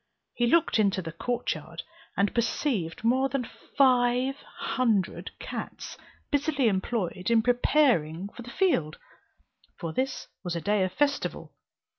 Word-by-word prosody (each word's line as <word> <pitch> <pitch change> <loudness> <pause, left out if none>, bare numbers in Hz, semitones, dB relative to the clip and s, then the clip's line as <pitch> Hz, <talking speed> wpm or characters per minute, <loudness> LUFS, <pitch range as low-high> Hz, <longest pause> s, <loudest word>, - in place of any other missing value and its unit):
He 240 - +1
looked 315 -3 +3
into 195 -3 +2
the 165 - -5
court 240 +9 -1
yard, - - -8 0.3
and 200 +1 +2
perceived 230 - -1
more 260 +4 +3
than 270 -4 -2 0.3
five 255 0 +4 0.2
hundred 225 -7 0
cats, - - -6 0.4
busily 285 -3 +2
employed 190 -2 -1
in 230 -1 +4
preparing 240 - +2
for 240 - -11
the 240 - -9
field, 240 - +1 0.8
for 165 -1 -5
this 265 +5 -2 0.2
was 175 -2 -3
a - - -1
day 205 +2 +1
of 185 - -1
festival. 285 +4 -1
240 Hz, 135 wpm, -28 LUFS, 190-270 Hz, 0.8 s, five